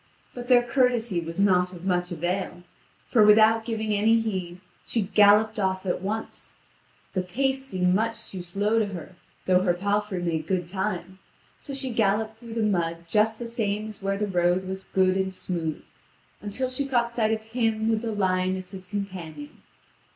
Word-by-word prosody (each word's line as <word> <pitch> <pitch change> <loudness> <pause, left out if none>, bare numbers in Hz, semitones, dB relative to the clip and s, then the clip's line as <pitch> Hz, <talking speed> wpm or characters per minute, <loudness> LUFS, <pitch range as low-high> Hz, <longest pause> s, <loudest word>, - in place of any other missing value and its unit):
But 245 -1 -7
their 245 -1 +6
courtesy 240 -6 +1
was 165 +2 -6
not 180 -2 +3
of 180 0 -10
much 180 -1 0
avail; 175 +1 -3 0.4
for, 220 - +4
without 220 +2 +6
giving 220 -2 -2
any 220 +3 +4
heed, 185 -5 -3 0.2
she 230 - -1
galloped 210 +2 +4
off 190 -1 -1
at 180 - -1
once. 215 +3 -5 0.6
The 185 - +1
pace 265 +9 -1
seemed 180 -6 +1
much 225 +3 -1
too 185 - -5
slow 205 +5 0
to 215 - +1
her, 185 -1 -8 0.3
though 185 0 +4
her 180 -2 +2
palfrey 205 +1 -1
made 160 -2 -2
good 180 -3 -1
time. 190 -1 -4 0.4
So 275 - -7
she 265 -2 -4
galloped 220 0 0
through 230 -1 -9
the 225 - 0
mud 170 -5 0
just 215 +3 +2
the 240 - -6
same 215 -2 -2
as 210 -2 -12
where 195 0 -1
the 210 - 0
road 180 -1 +1
was 190 0 -5
good 185 -1 +2
and 190 0 0
smooth, 175 -4 -4 0.6
until 255 +5 -3
she 275 +2 -2
caught 240 -3 +1
sight 225 -2 +1
of 220 0 -1
him 225 -1 0
with 225 -1 +1
the 230 -1 -3
lion 185 -2 +1
as 185 -1 -7
his 185 -1 -9
companion. 180 -7 -6
200 Hz, 180 wpm, -26 LUFS, 185-225 Hz, 0.6 s, their